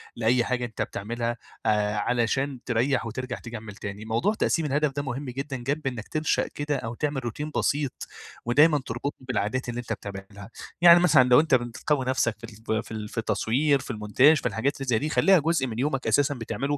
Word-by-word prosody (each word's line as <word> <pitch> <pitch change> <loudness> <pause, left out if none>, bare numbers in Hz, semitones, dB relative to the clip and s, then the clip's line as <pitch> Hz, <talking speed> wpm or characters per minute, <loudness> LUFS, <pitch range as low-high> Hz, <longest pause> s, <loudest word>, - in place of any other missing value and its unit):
لأي 120 +2 +2
حاجة 125 0 -1
أنت 115 - -6
بتعملّها 120 +3 -3 0.3
آآ 105 0 +1
علشان 125 +5 0
تريّح 125 +2 +1
وترجع 120 +2 -5
تكمّل 110 -3 -8
تاني، 100 +1 -7
موضوع 115 - +1
تقسيم 165 -6 0
الهدف 150 +1 +1
ده 145 +1 -3
مهم 135 +1 -4
جدًا 135 +2 -4
جنب 140 +4 -3
إنّك 120 -4 -4
تنشأ 155 0 0
كده 145 0 -3
أو 115 -2 -5
تعمل 145 -1 -2
روتين 150 +6 -4
بسيط 140 -3 -1 0.4
ودايمًا 145 +6 +5
تربطني 130 +3 -5
بالعادات 125 +1 -1
اللي 120 0 -4
أنت 120 -2 -3
بتعملها، 100 0 -9 0.3
يعني 170 0 +9
مثلًا 160 -7 +6
لو 125 - +7
أنت 155 -3 +3
بتقوّي 125 +3 -1
نفسك 125 -3 +1
في - - -26 0.3
ال 110 0 0
في - - -14
ال 105 -1 -5
في - - -13
التصوير 135 +6 +1
في 130 - -6
المونتاج 120 +8 +4
في - - -7
الحاجات 135 +6 -1
اللي 135 -1 -6
زي 115 -3 +3
دي 150 - -2
خلّيها 190 +3 +5
جُزء 155 -3 +1
من 115 -1 -5
يومك 135 -2 -1
أساسًا 140 +6 +3
بتعمله 140 +4 -3
125 Hz, 195 wpm, -26 LUFS, 115-145 Hz, 0.4 s, يعني